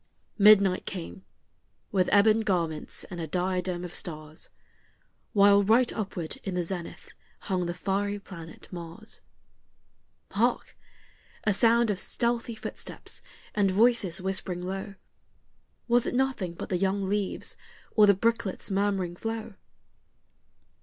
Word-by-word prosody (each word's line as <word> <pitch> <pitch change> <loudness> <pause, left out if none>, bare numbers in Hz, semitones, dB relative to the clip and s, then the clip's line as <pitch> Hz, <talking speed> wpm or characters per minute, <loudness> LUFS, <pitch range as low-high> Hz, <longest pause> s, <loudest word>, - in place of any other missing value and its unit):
Midnight 200 -3 +6
came 85 +3 -6 0.7
with 185 -2 +2
ebon 215 +2 +6
garments 170 -7 0
and 175 -2 -5
a 160 - -3
diadem 180 +1 -1
of 175 - -8
stars, 155 -1 -5 0.8
While 200 0 +6
right 230 +5 +4
upward 185 -6 -4
in 190 - -3
the 180 - +1
zenith 175 0 -6 0.3
hung 185 -4 -1
the 175 - -3
fiery 200 +2 -1
planet 165 -5 -11
Mars. 175 +4 -8 1.1
Hark! - - 0 0.7
a 210 - +3
sound 230 +2 +4
of 195 - -3
stealthy 235 +2 -1
footsteps - - -7 0.3
and 200 -2 +3
of 185 - -2
voices 215 -5 +3
whispering 185 -1 -2
low, 195 +2 -5 0.9
Was 240 0 +3
it - - -2
nothing 250 -10 0
but - - -6
the 180 - +1
young 195 +1 0
leaves, 200 -1 -2 0.4
or 210 -2 +7
the 200 - +6
brooklet's 220 -2 0
murmuring 195 -3 0
flow? 225 +2 -4
195 Hz, 125 wpm, -28 LUFS, 180-215 Hz, 1.1 s, or